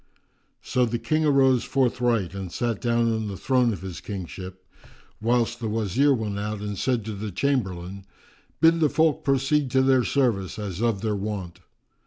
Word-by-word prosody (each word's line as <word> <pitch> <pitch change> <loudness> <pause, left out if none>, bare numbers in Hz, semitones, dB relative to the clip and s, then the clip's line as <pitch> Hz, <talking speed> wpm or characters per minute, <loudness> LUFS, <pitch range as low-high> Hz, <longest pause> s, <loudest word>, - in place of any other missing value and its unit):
So 125 - +1
the 120 +1 -1
King 155 +5 0
arose 135 -4 +4
forthright 120 - 0
and 95 -2 -6
sat 115 0 -2
down 115 -1 +2
on 110 -1 -2
the 100 -2 -5
throne 125 0 +2
of 95 -4 -6
his 95 -3 -6
kingship, 95 -1 -7 0.6
whilst 120 +1 +1
the 115 -2 -3
Wazir 110 +6 +2
went 110 -6 -1
out 105 0 -3
and 105 0 -4
said 120 +2 -1
to 110 - -4
the 105 +1 -5
Chamberlain, 100 -5 -2 0.5
"Bid 165 +1 +5
the 155 -2 +3
folk 160 0 +2
proceed 135 +1 +1
to 130 +1 +3
their 130 -1 +4
service, 115 -10 0
as 100 -2 -5
of 115 -4 +1
their 110 -2 -1
wont." 100 -4 -5
115 Hz, 175 wpm, -25 LUFS, 100-130 Hz, 0.6 s, Bid